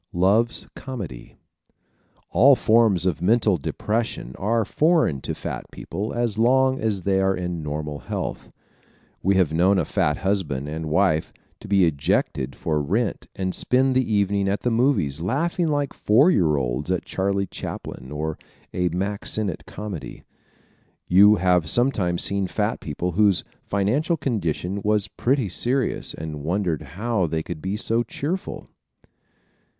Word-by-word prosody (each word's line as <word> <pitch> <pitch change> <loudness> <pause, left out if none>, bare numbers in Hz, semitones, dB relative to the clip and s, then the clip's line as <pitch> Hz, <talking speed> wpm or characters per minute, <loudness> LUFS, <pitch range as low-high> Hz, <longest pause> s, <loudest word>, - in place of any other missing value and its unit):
Loves 100 +7 +2
Comedy 100 - -7 0.4
¶ - - -40
All 130 +10 +6
forms 110 -7 +3
of 90 -3 0
mental 105 0 +3
depression 105 - -3
are 110 +3 +1
foreign 155 - +2
to - - -4
fat - - -6
people 105 +3 -5
as 120 -3 -1
long 130 +3 +3
as 105 -4 -1
they 95 0 +2
are 95 0 +2
in 90 -2 -4
normal 75 -1 -4
health. - - -5 0.7
We 95 +2 +2
have 90 -5 +2
known 95 +4 +3
a - - +1
fat 75 0 0
husband 85 -9 -1
and 80 +1 -4
wife 80 -1 +2 0.3
to - - -11
be 100 -2 +4
ejected 70 -3 0
for 75 -2 -1
rent 105 +10 -1
and 95 -1 -2
spend 130 +1 +2
the 130 -3 +1
evening 100 -1 +1
at 100 - -1
the 125 - 0
movies 115 - +1
laughing 165 - 0
like 145 -2 -1
four 130 - +4
year 80 - +2
olds 65 +4 -2
at 90 -1 -1
Charlie 100 +1 -1
Chaplin 65 -6 -7
or 75 +1 -3 0.3
a 90 -1 +1
Mack 100 +4 -3
Sennett 105 -6 -2
comedy. 100 -6 -7 0.9
You 100 +4 +7
have 90 -4 +2
sometimes 100 -9 +1
seen 100 -1 +1
fat 105 +3 -1
people 85 +4 -3
whose 100 0 +3 0.2
financial 125 - +1
condition 100 - -2
was 105 0 +1
pretty 130 0 0
serious 125 +8 0
and 75 -2 -6
wondered 85 -1 -1 0.2
how 110 -4 0
they 80 0 -2
could 85 -3 -7
be 95 +2 -2
so 115 +2 0
cheerful. 150 - -4
100 Hz, 150 wpm, -23 LUFS, 85-115 Hz, 0.9 s, You